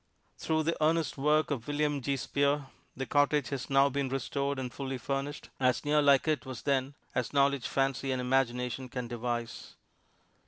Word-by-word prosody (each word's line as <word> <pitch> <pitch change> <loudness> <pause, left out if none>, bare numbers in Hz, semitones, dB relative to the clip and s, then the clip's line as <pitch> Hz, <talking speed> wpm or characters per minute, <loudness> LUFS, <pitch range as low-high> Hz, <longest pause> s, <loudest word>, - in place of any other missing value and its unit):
Through 160 0 0
the 165 0 -1
earnest 160 -2 +2
work 150 +2 +2
of 120 -5 -3
William 145 -1 0
G. 140 +2 -1
Spear, 140 +2 0 0.3
the 135 - -2
cottage 145 -2 +2
has 135 -3 -4
now 135 0 +5
been 140 -1 -1
restored 140 +1 -2
and 125 -2 -4
fully 135 -1 -4
furnished, 135 +3 -4
as 125 0 +2
near 150 +1 +4
like 140 0 +4
it 155 -1 +1
was 130 -4 -7
then 135 0 0 0.2
as 125 +1 -2
knowledge, 140 -2 +2
fancy 135 0 0
and 130 - -1
imagination 125 0 0
can 125 -1 -4
devise. 120 -1 -4
135 Hz, 170 wpm, -30 LUFS, 125-145 Hz, 0.3 s, now